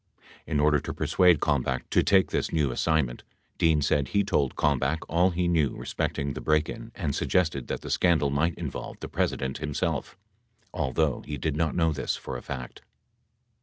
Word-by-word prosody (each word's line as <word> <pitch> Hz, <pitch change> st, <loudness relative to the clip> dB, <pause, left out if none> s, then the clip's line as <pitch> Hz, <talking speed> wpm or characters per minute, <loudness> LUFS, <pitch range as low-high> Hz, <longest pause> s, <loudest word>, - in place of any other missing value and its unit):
In 75 Hz, -, 0 dB
order 75 Hz, 0 st, +4 dB
to -, -, -6 dB
persuade 90 Hz, -4 st, +3 dB
Kalmbach 65 Hz, -3 st, 0 dB
to -, -, +4 dB
take 95 Hz, -1 st, +3 dB
this -, -, -1 dB
new 75 Hz, -5 st, +1 dB
assign 80 Hz, +3 st, +2 dB
ment, -, -, -9 dB, 0.4 s
Dean 80 Hz, -3 st, +3 dB
said, 70 Hz, -1 st, +1 dB
he 100 Hz, +9 st, +1 dB
told 70 Hz, -8 st, 0 dB
Kalmbach 70 Hz, +1 st, +1 dB
all 85 Hz, +4 st, +3 dB
he 90 Hz, 0 st, -1 dB
knew 80 Hz, -6 st, +2 dB
respecting 70 Hz, 0 st, -3 dB
the -, -, -6 dB
break 75 Hz, +1 st, +2 dB
in 115 Hz, 0 st, -7 dB
and 80 Hz, -8 st, -2 dB
suggested 80 Hz, -7 st, 0 dB
that -, -, -3 dB
the -, -, -6 dB
scandal 80 Hz, -6 st, +3 dB
might 80 Hz, +4 st, +1 dB
involve -, -, -6 dB
the -, -, -6 dB
President 65 Hz, 0 st, -2 dB
himself, 75 Hz, -1 st, -2 dB, 0.6 s
although 70 Hz, +1 st, 0 dB
he 75 Hz, -, -4 dB
did 75 Hz, +3 st, -2 dB
not 80 Hz, -1 st, 0 dB
know 80 Hz, -2 st, +2 dB
this 70 Hz, -, -2 dB
for 65 Hz, -, -7 dB
a 60 Hz, -, -5 dB
fact. 65 Hz, -2 st, -7 dB
75 Hz, 185 wpm, -27 LUFS, 70-85 Hz, 0.6 s, order